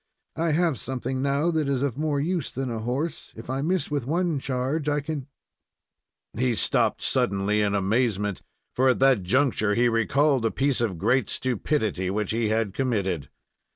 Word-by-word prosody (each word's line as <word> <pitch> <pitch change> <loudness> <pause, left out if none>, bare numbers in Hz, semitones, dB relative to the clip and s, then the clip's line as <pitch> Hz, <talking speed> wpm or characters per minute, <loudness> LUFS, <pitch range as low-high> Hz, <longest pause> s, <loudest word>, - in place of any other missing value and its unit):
I 165 +1 0
have 165 -5 +1
something 130 0 -3
now 140 +5 +1
that 155 -3 0
is 135 -1 0
of 140 -5 -1
more 150 0 -1
use 165 0 -1
than 130 -1 -3
a 115 - -3
horse. 130 +9 -3
If 115 +3 -7
I 135 +1 -1
miss 170 0 -1
with 140 -4 -2
one 170 -1 0
charge, 135 +4 -1
I 145 0 +1
can 145 -2 -5 0.5
" - - -60 0.3
He 125 0 +1
stopped - - +1
suddenly 100 +2 +1
in 100 -1 +1
amazement, 105 -1 0 0.3
for 130 +1 +3
at 125 - +3
that 135 -5 +4
juncture 110 0 +1
he 120 +1 +3
recalled 130 +4 +2
a 115 - +2
piece 135 0 0
of 105 -7 -1
great 115 +5 +1
stupidity 110 -6 -1
which 105 +1 -1
he 115 -1 0
had 110 -3 0
committed. 100 - -1
130 Hz, 180 wpm, -25 LUFS, 110-145 Hz, 0.5 s, that